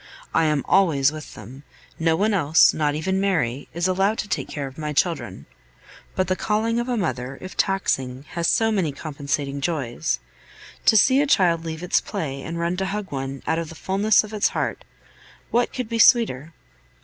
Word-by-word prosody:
I 165 - +3
am 150 -3 0
always 150 -8 +3
with 155 -1 -9
them; 130 +3 -11 0.4
no 165 0 +2
one 210 +5 +1
else, 160 -5 +5
not 150 -1 0
even 190 +5 -1
Mary, 155 -10 0
is 170 +2 -1
allowed 195 +4 +1
to - - -3
take - - -2
care 145 -2 -4
of 135 +2 -10
my 150 -1 -3
children. 140 - -1 0.7
But 185 -1 0
the 185 - +1
calling 225 +3 0
of 240 +1 -3
a 245 - 0
mother, 130 - -3
if 185 - -9
taxing, 135 -9 -1
has 170 -1 -1
so 225 -1 +2
many 180 -9 0
compensating 140 -1 -3
joys! 135 - -2 0.7
To 220 - +7
see 260 +7 +5
a 295 - +1
child 170 -9 +3
leave 160 +1 -5
its 180 - +2
play 135 -3 -4
and 165 +4 -5
run 170 +2 -1
to 190 0 -1
hug 205 0 -4
one, 135 0 -5
out 160 +1 0
of 165 -2 -5
the 165 - -10
fulness 200 +5 +2
of 215 0 -10
its 210 - +2
heart, - - -3 0.7
what 240 +1 +1
could 250 -3 -4
be 230 0 -3
sweeter? 170 - +4
165 Hz, 195 wpm, -23 LUFS, 145-195 Hz, 0.7 s, To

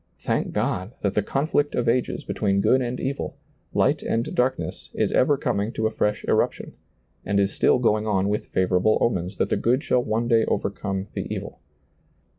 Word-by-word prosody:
Thank - - -1
God 95 +6 -2
that 100 - 0
the 105 - +2
conflict 145 +5 0
of 120 - 0
ages 120 +2 0
between 100 -2 0
good 130 +6 +3
and 125 0 -3
evil, 140 +1 -3 0.3
light - - +2
and 115 +1 -1
darkness, 130 +1 -1
is - - +1
ever 140 +2 +3
coming 105 -3 -1
to 110 - -1
a 110 - +1
fresh 105 -1 -1
eruption, - - 0 0.5
and 100 0 +1
is 100 0 +1
still - - +3
going 110 -3 +1
on 95 -2 +1
with 105 +1 -1
favorable 95 +3 +2
omens 95 -4 -1
that - - 0
the - - +2
good 125 +5 +1
shall 125 - +2
one 115 0 -1
day 115 -2 +4
overcome 100 -1 -2
the - - -4
evil. - - -5
110 Hz, 185 wpm, -24 LUFS, 100-125 Hz, 0.5 s, day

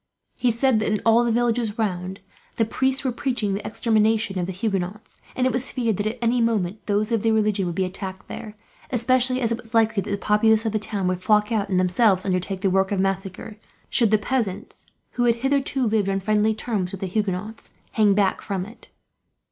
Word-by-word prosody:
He 250 - +2
said 235 0 +2
that 215 - 0
in 210 - +1
all 230 +1 +5
the 235 - +1
villages 235 -2 0
round, 190 -2 -3 0.3
the 225 - +2
priests 265 +4 0
were 260 - 0
preaching 240 -5 -1
the 200 - -3
extermination 220 -3 +1
of 175 - -2
the - - -3
Huguenots; 195 +1 -4
and 255 - +1
it 255 - +1
was 255 +2 0
feared 230 -6 -1
that, 205 - -1
at 225 +3 -3
any 235 +1 +2
moment, 210 -4 0
those 210 +2 0
of 225 -2 +1
the 225 - +2
religion 210 -3 +1
would 170 - -4
be 190 - +1
attacked 190 +1 -7
there; 215 -1 -8 0.3
especially 255 +1 +2
as 230 -2 +1
it 230 - -1
was 230 -1 -9
likely 225 -2 +3
that - - -7
the 200 - -1
populace 220 +2 +3
of 220 - 0
the 215 - 0
town 200 -3 -2
would 185 0 -1
flock 210 +2 +2
out, 210 -3 0
and 185 -2 +2
themselves 185 +1 +2
undertake 185 0 -2
the 195 - +2
work 190 +1 +2
of 200 - 0
massacre 195 +2 -3 0.3
should 230 -4 +3
the 215 - +4
peasants, 210 -3 -3 0.2
who 245 - 0
had 235 -1 +4
hitherto 270 +1 0
lived 215 -3 +1
on 195 0 0
friendly 215 +2 +1
terms 210 -5 -2
with 195 - -8
the - - -1
Huguenots, 205 +2 -3 0.2
hang 210 -3 +3
back 195 -2 +1
from 195 -3 -3
it. 220 +4 -14
215 Hz, 220 wpm, -23 LUFS, 195-230 Hz, 0.3 s, all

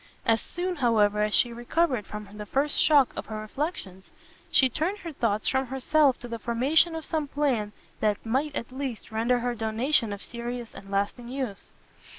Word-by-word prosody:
As 225 -1 +3
soon, 360 +1 -3
however, 210 -5 +3
as 210 0 +2
she 240 - +3
recovered 240 - 0
from 210 -1 -7
the 210 - -5
first 285 +5 0
shock 290 -4 +5
of - - -5
her 215 -1 -5
reflections, 215 - -4 0.4
she 265 - +5
turned 320 - -1
her 340 -5 -7
thoughts 220 -7 0
from 265 0 +1
herself 265 +1 +3
to 245 - -6
the 230 -1 -5
formation 275 +9 +2
of 320 - -5
some 310 -3 -1
plan 265 -8 0 0.3
that 210 0 0
might, 275 +6 0
at 235 - -4
least, 260 -4 -5
render 230 +3 +2
her 245 0 0
donation 225 +2 +1
of 200 -1 -5
serious 240 0 -5
and 195 - -11
lasting 200 +5 -1
use. 250 -6 -5
245 Hz, 180 wpm, -27 LUFS, 220-285 Hz, 0.4 s, shock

